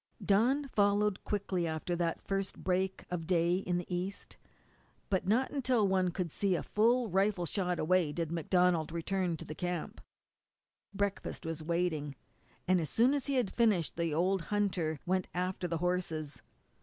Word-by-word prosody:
Dawn 250 +8 +3
followed 205 -2 +2
quickly 190 -4 -1
after 160 +2 -2
that 170 -1 -1
first 195 -1 -2
break 190 +1 -1
of 165 -3 -3
day 175 0 +3
in 180 -2 -1
the 175 0 -3
east, 185 +3 -4 0.8
but 185 -1 +1
not 240 +6 +2
until 255 -6 +2
one 190 -1 +2
could 175 -2 -3
see 195 +1 +1
a - - -2
full 235 +3 +2
rifle 195 -1 +1
shot 180 0 -1
away 175 -1 +2
did 165 0 -3
MacDonald 170 -1 +2
return 175 +1 -1
to - - -8
the - - -6
camp. 175 +1 -4 0.9
Breakfast 200 -3 -3
was 165 -1 -4
waiting, 160 -3 -1 0.5
and 185 -1 +4
as 155 - -3
soon 245 +4 +4
as 285 -1 -1
he 280 - 0
had 245 -7 0
finished 210 - +2
the 170 -1 -1
old 180 +5 +1
hunter 180 -5 0
went 185 0 0
after 180 0 -1
the 165 -1 -1
horses. 165 -4 -2
180 Hz, 165 wpm, -32 LUFS, 170-200 Hz, 0.9 s, and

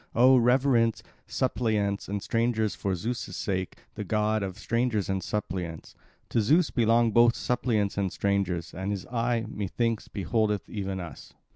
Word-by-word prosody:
Oh, 130 +3 +7
reverence 125 -2 +3 0.2
suppliants 110 -6 0
and 100 0 -3
strangers 115 -2 0
for 95 -2 -2
Zeus' 115 +7 -4
sake, 95 -2 -3 0.2
the - - -5
god 110 +2 0
of 95 -1 -4
strangers 115 -3 0
and 95 -1 0
suppliants. 90 -6 -4 0.4
To 115 - +2
Zeus 155 - +3
belong 115 -1 +3
both 120 +2 +5
suppliants 110 -5 0
and 95 -2 0
strangers; 95 -4 -1
and 95 +2 -4
his 100 -2 -3
eye, 115 -1 0
methinks, 110 +3 -2
beholdeth 105 0 -1
even 95 -3 -4
us." 85 -3 -9
110 Hz, 145 wpm, -27 LUFS, 100-120 Hz, 0.4 s, Oh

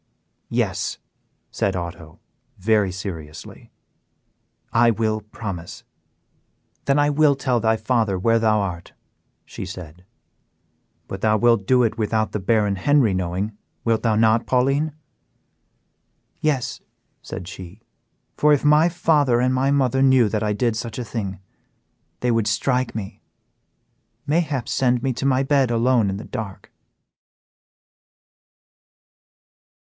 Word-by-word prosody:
"Yes," - - -1 0.5
said 95 -1 -1
Otto, 85 -2 -7 0.4
very 105 -1 +2
seriously, 85 -5 -8 1.0
"I 120 0 +5
will 110 -1 0
promise." 95 -4 -7 1.0
"Then 140 +1 +2
I 145 0 +3
will 145 -1 +4
tell 130 -3 0
thy 110 0 +2
father 110 -3 0
where 115 +5 +2
thou 110 -2 +2
art," 90 -4 -5 0.5
said 95 - -7
she. 90 -5 -9 1.1
"But 95 - -7
thou 110 0 +3
wilt 115 -3 +2
do 125 -1 +4
it 115 0 -1
without 110 0 0
the 105 - -2
Baron 105 -1 +1
Henry 130 0 +3
knowing, 95 +3 -2 0.3
wilt 115 -1 +2
thou 110 -2 +1
not, 110 +1 +3
Pauline?" 135 +4 +1 1.5
"Yes," 145 -5 -1 0.4
said 85 - -7
she, 95 +2 -10 0.5
"for 150 - +3
if 145 - +1
my 150 +3 +5
father 150 -8 +2
and 130 +1 +2
my 130 +1 +1
mother 135 -2 +2
knew 130 -4 +5
that 110 0 -1
I 105 -1 0
did 115 +2 0
such 115 -1 -5
a 125 - -4
thing, 100 -4 -4 0.8
they 125 - +1
would 115 -2 +1
strike 125 +4 0
me, 100 -3 -6 1.0
mayhap 145 -6 0
send 125 -3 +1
me 135 -1 0
to 135 +3 -2
my 130 0 +2
bed 135 -2 +2
alone 120 -2 +2
in 95 - -3
the 105 - -8
dark." 100 -3 -7
115 Hz, 130 wpm, -22 LUFS, 100-130 Hz, 1.5 s, I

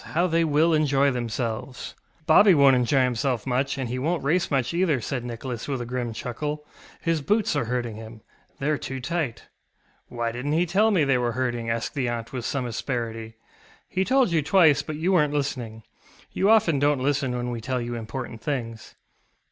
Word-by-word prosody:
How 175 - +4
they 165 -1 +2
will 160 +2 +3
enjoy 140 -2 +3
themselves! 120 +1 -4
ŌĆØ 160 - -36
ŌĆ£Bobby 185 +5 +6
wonŌĆÖt 140 -2 +6
enjoy 125 +2 +2
himself 125 -1 -1
much, 135 +2 0
and 130 -2 -2
he 125 +2 -3
wonŌĆÖt 165 +5 -1
race 170 +6 +1
much 135 +1 0
either, 170 -4 +2
ŌĆØ 120 - -7
said 130 -3 -3
Nicholas 120 0 -6
with 135 -3 -2
a 120 - -4
grim 120 -1 -3
chuckle; 145 +6 -4 0.4
ŌĆ£his 165 -3 +1
boots 210 0 +1
are 145 - 0
hurting 120 -2 -3
him. 110 0 -10 0.4
TheyŌĆÖre 145 +1 0
too 135 0 -5
tight. 140 -3 -3 0.7
ŌĆØ - - -11
ŌĆ£Why 115 -1 -1
didnŌĆÖt 130 +5 -2
he 170 +2 +3
tell 200 +6 +3
me 185 -8 +3
they 135 -3 +2
were 120 -1 -1
hurting? 120 -2 -2
ŌĆØ - - 0
asked 115 0 -4
the 130 -4 -1
aunt 115 0 -5
with 125 -3 -4
some 135 -3 -2
asperity. 115 -2 -4 0.6
ŌĆ£He 190 - +3
told 255 -2 +2
you 165 -2 +2
twice, 155 -3 +4
but 155 - -6
you 165 +5 0
werenŌĆÖt 150 -5 +3
listening. 125 -6 -3 0.5
You 195 - +1
often 170 -10 +4
donŌĆÖt 145 -1 +3
listen 135 -2 0
when 120 0 -3
we 120 -1 -4
tell 130 +2 -2
you 120 0 -4
important 115 0 -6
things. 115 -5 -4
135 Hz, 205 wpm, -25 LUFS, 120-155 Hz, 0.7 s, ŌĆ£Bobby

